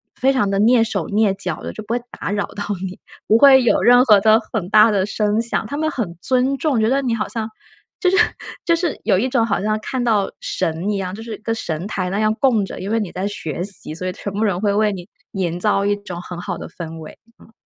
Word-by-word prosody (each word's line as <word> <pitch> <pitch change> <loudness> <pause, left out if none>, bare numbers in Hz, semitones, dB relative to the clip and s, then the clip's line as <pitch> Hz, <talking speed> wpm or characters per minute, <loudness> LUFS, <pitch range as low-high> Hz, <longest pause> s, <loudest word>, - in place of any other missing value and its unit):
非 265 +2 +2
常 205 -7 +1
地 195 0 0
蹑 230 +2 +5
手 195 -7 -2
蹑 210 -1 +2
脚 180 -5 -3
的， - - -6
就 215 - -8
不 225 - -4
会， 245 - +1 0.2
打 - - -4
扰 205 0 -1
到 205 - -4 0.2
你， 185 - -9 0.3
不 220 - +5
会 265 0 +7
有 240 - +3
任 245 +1 +6
何 210 -4 +6
的 220 +1 +5
很 190 -5 -2
大 215 +1 +6
的 195 -2 +1
声 210 0 0
响。 230 -2 +1
他 285 - -5
们 315 0 0
很 175 -9 -4
尊 260 +2 +1
重， 280 -7 0
觉 220 - +2
得 275 +1 +2
你 245 -3 -1
好 215 - -2
像， 225 -1 -4 0.5
就 365 - +4
是 380 - +2 0.5
就 335 - +3
是 335 -3 -2
有 185 - +3
一 255 +6 0
种 235 -3 +2
好 200 -3 -1
像 215 +1 0
看 255 +1 -3
到 210 -4 +1
神 165 +5 -2
一 200 - -1
样， 185 0 -4
就 225 - -9
是 225 -2 -6
跟 225 0 -1
神 165 -2 -4
台 185 -3 -3
那 200 +2 -2
样 215 0 +2
供 230 -8 +3
着， - - -8
因 200 +3 -4
为 225 - +2
你 205 -5 -4
在 185 +2 -3
学 170 -4 -4
习， 195 -5 -3
所 185 - -5
以 - - -1
全 200 +2 -6
部 210 +2 -1
人 190 -4 0
会 205 -1 +1
为 210 0 +2
你 180 -1 -7 0.2
营 175 -3 -2
造 200 0 +2
一 205 0 +2
种 180 -4 -8
很 180 -1 -8
好 - - -4
的 - - -7
氛 165 -2 -7
围， 155 - -11 0.2
嗯。 225 - -19
210 Hz, 280 characters per minute, -20 LUFS, 190-230 Hz, 0.5 s, 会